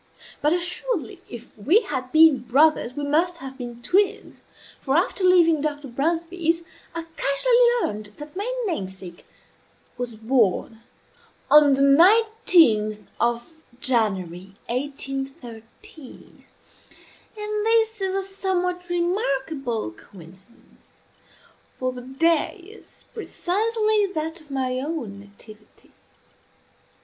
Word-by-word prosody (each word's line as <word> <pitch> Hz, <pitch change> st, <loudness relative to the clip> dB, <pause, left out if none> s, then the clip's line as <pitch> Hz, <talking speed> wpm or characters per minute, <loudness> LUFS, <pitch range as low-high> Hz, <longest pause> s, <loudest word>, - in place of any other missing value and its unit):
But 300 Hz, +1 st, +2 dB
assuredly 355 Hz, -, -2 dB
if 240 Hz, -1 st, -11 dB
we 315 Hz, -, +3 dB
had 260 Hz, -, -5 dB
been 315 Hz, -3 st, +6 dB
brothers 255 Hz, +1 st, +2 dB
we 290 Hz, -, -4 dB
must 330 Hz, +5 st, +1 dB
have 270 Hz, -4 st, -9 dB
been 240 Hz, -2 st, -8 dB
twins; 390 Hz, +6 st, 0 dB, 0.4 s
for, 270 Hz, 0 st, -1 dB
after 370 Hz, +2 st, 0 dB
leaving 340 Hz, -4 st, +5 dB
Dr. 290 Hz, -1 st, -3 dB
Bransby's, 330 Hz, +5 st, -1 dB, 0.3 s
I 335 Hz, 0 st, -4 dB
cassually 480 Hz, -, +3 dB
learned 210 Hz, +1 st, -8 dB
that 295 Hz, +3 st, -10 dB
my 410 Hz, +6 st, -3 dB
namesake 190 Hz, -, -6 dB, 0.7 s
was 245 Hz, -2 st, -4 dB
born 225 Hz, -1 st, 0 dB, 0.7 s
on 295 Hz, -2 st, +7 dB
the 275 Hz, -, +2 dB
nineteenth 330 Hz, -, +4 dB
of 235 Hz, +5 st, -1 dB, 0.3 s
January, 195 Hz, -, -1 dB
1813; 270 Hz, -, -7 dB, 0.9 s
and 425 Hz, 0 st, -3 dB
this 445 Hz, -2 st, +2 dB
is 380 Hz, 0 st, -1 dB
a 390 Hz, -, -1 dB
somewhat 360 Hz, -2 st, -2 dB
remarkable 275 Hz, -, -1 dB
coincidence; 185 Hz, -, -18 dB, 0.8 s
for 255 Hz, 0 st, -1 dB
the 250 Hz, -1 st, -8 dB
day 300 Hz, -, +1 dB
is 430 Hz, +4 st, -17 dB
precisely 430 Hz, +1 st, 0 dB
that 320 Hz, +2 st, -4 dB
of 305 Hz, -, -20 dB
my 260 Hz, -2 st, -2 dB
own 260 Hz, -9 st, -5 dB
nativity. 210 Hz, +1 st, -17 dB
295 Hz, 105 wpm, -23 LUFS, 240-360 Hz, 0.9 s, on